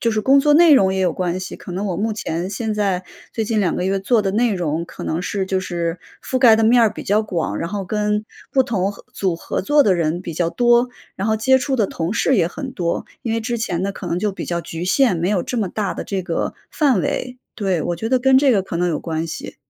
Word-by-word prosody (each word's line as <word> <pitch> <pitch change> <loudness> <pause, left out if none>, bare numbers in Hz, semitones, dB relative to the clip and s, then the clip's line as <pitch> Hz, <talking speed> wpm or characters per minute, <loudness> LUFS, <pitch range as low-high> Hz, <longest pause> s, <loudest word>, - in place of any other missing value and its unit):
就 230 - +1
是 215 -1 0
工 270 +5 +5
作 295 +1 +4
内 335 0 +7
容 190 -7 +4
也 190 - -1
有 180 -3 +2
关 180 -1 -2
系， 185 - -6
可 180 - -9
能 195 +4 -2
我 180 -3 -2
目 215 +4 -1
前 175 -4 -3
现 220 +2 -2
在 195 -3 0 0.3
最 225 - -2
近 215 0 0
2 180 -4 +1
个 180 - -2
月 195 +1 +1
做 220 +4 +2
的 195 - 0
内 225 +2 +1
容 170 -2 -2
可 - - -10
能 160 - -1
是 195 +1 -2
就 190 0 0
是 170 -2 -3 0.2
覆 260 - -1
盖 240 -3 +7
的 225 - +1
面 235 +2 +5
儿 220 -2 +3
比 - - -7
较 210 +2 +2
广， 165 - -2
然 165 - -3
后 200 0 -4
跟 210 +2 -1 0.3
不 265 - +4
同 200 -5 -1
合 200 - -15
组 185 -4 -1
合 - - -3
作 295 +7 +4
的 200 -8 +3
人 170 0 0
比 170 -3 -6
较 170 0 0
多， 240 +2 +3 0.3
然 195 - -2
后 220 0 +2
接 260 +5 +4
触 270 +1 -1
的 220 -5 +2
同 165 +4 -3
事 260 +3 +2
也 175 -5 +3
很 265 - -6
多。 170 -6 -2 0.2
因 230 - -2
为 230 - 0
之 235 +1 -2
前 185 -6 -2
的 200 - -1
可 - - -8
能 170 - -1
就 210 +3 0
比 195 - -6
较 170 0 -2
局 165 +1 -6
限， 240 0 +3
没 170 +2 -1
有 195 -4 +1
这 250 - -4
么 205 -4 0
大 200 0 -2
的 - - -5
这 195 -2 -3
个 170 -2 -2 0.2
范 275 - +2
围， 250 +7 -3 0.2
对， 190 -6 0
我 175 +2 -2
觉 220 +6 -3
得 255 +1 +3
跟 265 +1 +5
这 275 -1 +4
个 200 -4 +2
可 175 - -5
能 175 +1 +1
有 155 -3 -1
关 160 0 -3
系。 160 - -7
200 Hz, 290 characters per minute, -20 LUFS, 175-230 Hz, 0.3 s, 内